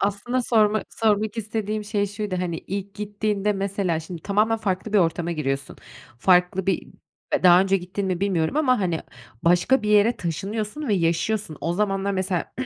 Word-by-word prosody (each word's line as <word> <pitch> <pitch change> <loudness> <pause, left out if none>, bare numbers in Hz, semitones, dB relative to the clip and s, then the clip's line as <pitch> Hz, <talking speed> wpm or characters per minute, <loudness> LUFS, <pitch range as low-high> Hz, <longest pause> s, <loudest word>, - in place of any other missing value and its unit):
Aslında 205 +6 -1
sorma 215 -2 +3
sormak 215 0 0
istediğim 215 -1 -3
şey 205 -1 0
şuydu, 205 -1 -4
hani, 175 -2 -2
ilk 200 +1 -6
gittiğinde 210 0 -1
mesela 195 -4 -1
şimdi 165 0 -9
tamamen 215 +3 +2
farklı 200 0 -2
bir 210 - +5
ortama 170 0 +1
giriyorsun. 135 -3 -3 0.4
Farklı 180 +4 +3
bir 195 - 0 0.5
daha 180 0 +7
önce 195 0 +2
gittin 190 +2 -4
mi 185 -1 -1
bilmiyorum 190 - 0
ama 255 -7 +3
hani 175 -4 0 0.4
başka 180 +9 +3
bir 210 - -2
yere 210 +3 +4
taşınıyorsun 210 - -4
ve 210 - +3
yaşıyorsun. 170 +1 0
O 170 - -1
zamanlar 195 0 0
mesela, 185 -2 -2
200 Hz, 160 wpm, -24 LUFS, 180-210 Hz, 0.5 s, daha